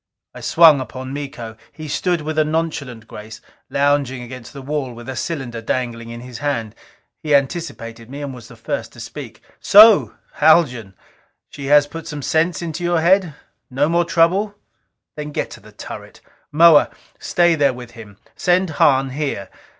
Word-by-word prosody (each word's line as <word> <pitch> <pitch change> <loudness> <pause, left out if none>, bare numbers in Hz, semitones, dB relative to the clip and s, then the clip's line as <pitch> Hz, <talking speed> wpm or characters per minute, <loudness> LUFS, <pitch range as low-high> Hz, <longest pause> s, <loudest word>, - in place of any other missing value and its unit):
I - - -11
swung 160 -4 +6
upon 130 +1 -7
Miko. 130 -6 -7 0.2
He 155 -1 -9
stood 175 +3 -1
with 155 +1 -2
a - - +5
nonchalant 150 -7 -3
grace, 110 +1 -10 0.3
lounging 140 -3 0
against 120 -1 -10
the 140 -2 -10
wall 140 -2 -3
with 120 +1 -11
a 130 - -5
cylinder 130 -5 -4
dangling 115 -1 -3
in 120 0 -8
his 125 -1 -9
hand. 120 -7 -2 0.5
He 150 -2 +2
anticipated 125 -6 -3
me, 140 +2 -7
and 140 -2 -5
was 120 -2 -11
the 120 - -14
first 110 - -5
to - - -14
speak. - - -9 0.2
"So, 215 +1 +7 0.2
Haljan, 125 - +3 0.6
she 140 -1 -7 0.2
put 165 0 -8
some 145 -2 -6
sense 165 +4 0
into 170 +1 -5
your 175 -1 +1
head? 175 -2 +3 0.3
No 140 +3 +1
more 170 +2 +2
trouble? 175 +5 +1 0.6
Then 150 0 -6
get - - -3
into - - -15
the - - -17
turret. - - -10 0.3
Moa, 160 0 +6 0.3
stay 175 -1 +2
there 145 -4 +2
with 125 -1 -10
him. 105 -4 -13 0.2
Send 180 -1 +1
Hahn 135 -2 +2
here. 135 -8 -4
145 Hz, 165 wpm, -19 LUFS, 125-165 Hz, 0.6 s, So